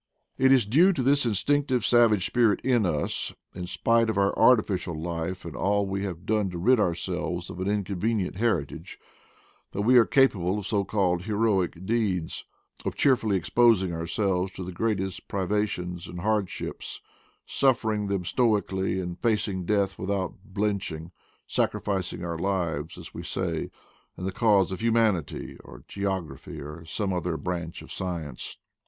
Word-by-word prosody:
It 130 0 +5
is 130 -5 +5
due 165 - +5
to 135 -7 -1
this 140 0 +3
instinctive 130 +2 +1
savage 115 -6 +4
spirit 115 -4 +3
in 120 -6 +2
us, 75 -4 -1 0.2
in 90 -1 -6
spite 115 +4 +2
of 110 - -1
our 100 0 +2
artificial 100 -8 +3
life 85 +2 -4
and 85 - -7
all 100 +1 +1
we 95 0 -2
have 90 -2 -6
done 105 -2 +1
to 90 - -6
rid 120 +8 +4
ourselves 90 -1 -2
of 90 - -8
an 95 - -2
inconvenient 100 0 -1
heritage, 100 -11 -1 0.8
that 100 - -1
we 125 +3 +6
are 115 - +5
capable 100 -9 +3
of 105 - -5
so 100 -1 +1
called 90 -3 0
heroic 100 -5 0
deeds; 100 -7 -1 0.4
of - - -3
cheerfully 115 -7 +3
exposing 95 -1 +3
ourselves 90 +3 -1
to 95 - -6
the 90 - -6
greatest 95 -1 -2
privations 95 -3 -2
and 90 - -7
hardships, 105 -1 -2 0.5
suffering 110 -6 +1
them 100 -2 -1
stoically, 95 -5 +1
and 90 -1 -5
facing 105 -5 0
death 100 -1 +1
without 95 0 -1
blenching, 95 -5 -3 0.3
sac - - +1
rificing 95 -3 -3
our 85 -1 -3
lives, 85 -4 -2
as 85 -1 -10
we - - -6
say, 85 -2 -2 0.5
in - - -7
the 95 - -1
cause 105 -4 +3
of 95 - -4
hu 115 0 +2
manity, 110 -8 0
or - - -13
geography, 95 -7 -4
or 75 +3 -8
some 95 +3 -2
other 90 -2 -1
branch 85 -2 -4
of - - -12
science. 85 -8 -5
95 Hz, 160 wpm, -27 LUFS, 90-110 Hz, 0.8 s, we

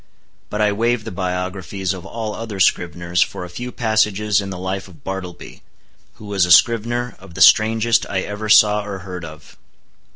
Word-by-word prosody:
But 105 - -3
I 105 -1 +3
waive 115 +2 0
the 110 - -7
biographies 95 +1 -3
of 95 0 -9
all 110 0 -5
other 110 -3 -6
scriveners 85 -1 +1
for 90 - -7
a - - -10
few 125 +7 -6
passages 105 -3 +1
in 100 - -6
the 95 - -6
life 95 +1 -4
of 90 -3 -18
Bartleby, 95 -2 -7 0.5
who 105 - -13
was 100 -2 0
a - - -1
scrivener 120 +5 +3
of 95 -3 -15
the - - -7
strangest 110 +1 +4
I 95 -2 -1
ever 105 +2 -5
saw 105 -1 +5
or 100 -1 -6
heard 90 -2 -7
of. 80 -2 -12
100 Hz, 185 wpm, -20 LUFS, 90-110 Hz, 0.5 s, saw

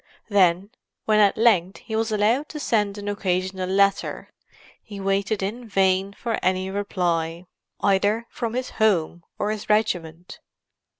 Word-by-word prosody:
Then, 190 0 +3 0.3
when 215 -1 +3
at 205 -2 +4
length 200 -5 +3
he 220 - -5
was 220 0 0
allowed 220 +8 +1
to 300 - -6
send 210 -6 0
an 205 0 -7
occasional 185 -2 -2
letter, 200 +1 +1 0.5
he 205 -2 -10
waited 195 +1 0
in 230 +4 -5
vain 195 0 +2
for 230 +2 -3
any 185 +1 0
reply, 175 -4 -2 0.4
either 205 +3 +2
from 230 -1 -4
his 255 0 -3
home 175 -5 +2
or 210 - -1
his 215 -1 -6
regiment. 180 -6 -1
200 Hz, 140 wpm, -23 LUFS, 185-215 Hz, 0.5 s, at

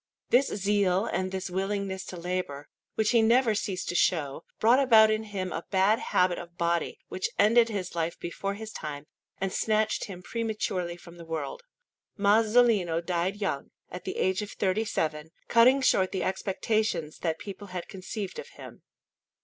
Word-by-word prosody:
This 260 +3 +5
zeal 200 -1 +1
and 185 0 -2
this 190 -1 -4
willingness 195 0 -2
to 180 - -7
labour, 170 -5 -4 0.3
which 220 -1 +2
he 235 -2 +5
never 230 +1 +4
ceased 195 -3 -3
to - - -1
show, 160 -4 +1 0.2
brought 235 +4 +5
about 220 -5 +6
in 215 0 -1
him 190 -3 -4
a - - -4
bad 195 +3 +3
habit 180 -1 +1
of 170 0 -11
body, 170 -1 0
which 185 - -2
ended 230 +3 +5
his 195 -4 -4
life 170 0 -2
before 195 +3 -4
his 220 +1 -7
time 150 -5 -6 0.3
and 195 0 -2
snatched 215 0 +1
him 180 -3 -9
prematurely 210 -7 -2
from 175 0 -14
the 170 - -10
world. 165 - -4 0.6
Masolino 210 -4 +4
died 175 +2 -1
young, 165 -9 -2 0.2
at 180 - -7
the - - -5
age 190 +2 +1
of 210 - -5
thirty 200 +3 0
seven, 155 -5 -2 0.2
cutting 250 +4 +5
short 190 -7 +3
the 190 - -2
expectations 190 -3 -1
that 160 -2 -1
people 200 +2 -8
had 180 -2 -6
conceived 195 - -6
of - - -7
him. - - -11
190 Hz, 170 wpm, -28 LUFS, 175-215 Hz, 0.6 s, about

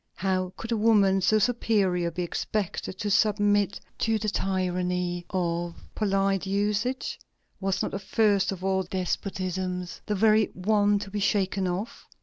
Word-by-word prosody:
How 185 -1 -1
could 225 - -6
a 230 - +2
woman 205 -3 +4
so 215 +4 +4
superior 200 -6 +1
be 180 +2 -3
expected 190 +1 -3
to 205 +1 -2
submit 205 -1 +2 0.2
to 225 -1 +2
the 215 0 -1
tyranny 180 -2 -1
of 170 -2 -1 0.2
polite 195 -2 +1
usages? 210 +6 -1 0.4
Was 190 -1 0
not - - -2
the 195 - -3
first 200 -1 +2
of 185 -1 -6
all 190 0 +1
despotisms 185 0 -3
the 210 - 0
very 215 +1 +4
one 205 +2 +2
to 200 -1 -6
be 210 - -2
shaken 195 -1 +1
off? 185 +5 -4
195 Hz, 145 wpm, -27 LUFS, 185-210 Hz, 0.4 s, woman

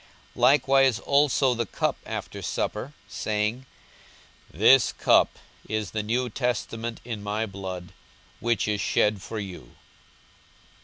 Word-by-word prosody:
42:022:020 - - -9
Likewise 135 -3 +4
also 140 -2 +3
the 115 -1 -1
cup - - -1
after - - -5
supper, 125 +7 -3
saying, 110 +4 -2 0.8
This 115 +8 +5
cup - - +3 0.3
is 110 -4 -2
the 110 - -1
new 120 +4 0
testament 115 -1 -3
in 115 -4 -5
my 105 +2 -2
blood, 95 -3 -7 0.5
which 120 -2 0
is 105 -1 0
shed 105 -2 +1
for 110 - -6
you. 95 -4 -8
110 Hz, 120 wpm, -26 LUFS, 105-125 Hz, 0.8 s, This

